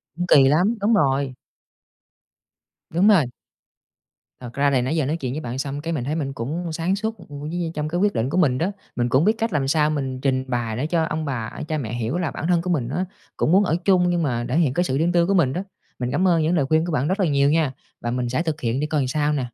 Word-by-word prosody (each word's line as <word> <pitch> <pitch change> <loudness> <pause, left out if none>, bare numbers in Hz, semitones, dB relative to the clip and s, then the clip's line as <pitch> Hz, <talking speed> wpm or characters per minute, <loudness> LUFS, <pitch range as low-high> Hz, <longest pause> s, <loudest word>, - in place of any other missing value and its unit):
Cũng 175 - -2
kỳ 135 -4 +6
lắm, 180 +11 +3
đúng 220 +3 +3
rồi. 135 -7 +1 1.5
Đúng 180 +6 +2
rồi. 190 -9 +6 1.1
Thật 120 -2 -9
ra 140 0 +2
thì 130 -2 +2
nãy 130 +6 -1
giờ 155 -4 +1
nói 155 +4 -1
chuyện 130 -4 -4
với 155 - -4
bạn 125 -2 -5
xong 140 +1 -3
cái 165 +1 -3
mình 130 -6 -2
thấy 150 +4 -2
mình 135 -4 -3
cũng 160 +8 -4
sáng 170 +4 0
suốt, 220 +1 -3
ừm, 145 -5 -10
với 150 +2 -5
vơi 170 -1 -3
trong 150 0 -2
cái 175 +3 -1
quyết 205 +1 +2
định 115 +4 -1
của 175 - -1
mình 135 -8 +3
đó. 180 +7 0 0.2
Mình 120 0 0
cũng 130 +7 +3
biết 215 - +4
cách 225 -4 -1
làm 135 -3 0
sao 150 +1 +2
mình 135 -4 -2
trình 130 -2 +1
bày 120 -3 -2
để 145 +4 -1
cho 165 -1 +1
ông 160 -1 -2
bà, 120 -6 -3 0.2
cha 155 - -1
mẹ 120 -5 -4
hiểu 120 +7 -2
là 170 -5 -1
bản 160 - -4
thân 175 -2 +3
của 180 - -4
mình 135 -9 0
á, 180 +7 -1 0.3
cũng 155 - +1
muốn 195 +3 +5
ở 165 - +1
chung 180 -2 +4
nhưng 175 -2 +1
mà 120 -4 -1
thể 130 - +1
hiện 150 -7 +2
cái 175 - +1
sự 135 -6 -1
riêng 165 +3 +2
tư 175 -1 +3
của 200 - +2
mình 155 -9 +3
đó. 180 +3 -3 0.4
Mình 125 0 -2
cảm 180 +8 +2
ơn 170 -3 +3
những 160 +3 +1
lời 145 -5 +2
khuyên 160 +3 +2
của 175 - -3
bạn 145 -1 0
rất 190 +3 -1
là 190 - +3
nhiều 140 -2 +3
nha, 155 -4 +2 0.3
và 120 - -2
mình 125 0 -1
sẽ 130 +6 0
thực 160 -2 -3
hiện 120 +2 -1
để 150 - -1
coi 150 -2 0
làm 130 - -1
sao 150 +2 0
nè. 140 -3 -1
150 Hz, 285 wpm, -22 LUFS, 130-175 Hz, 1.5 s, kỳ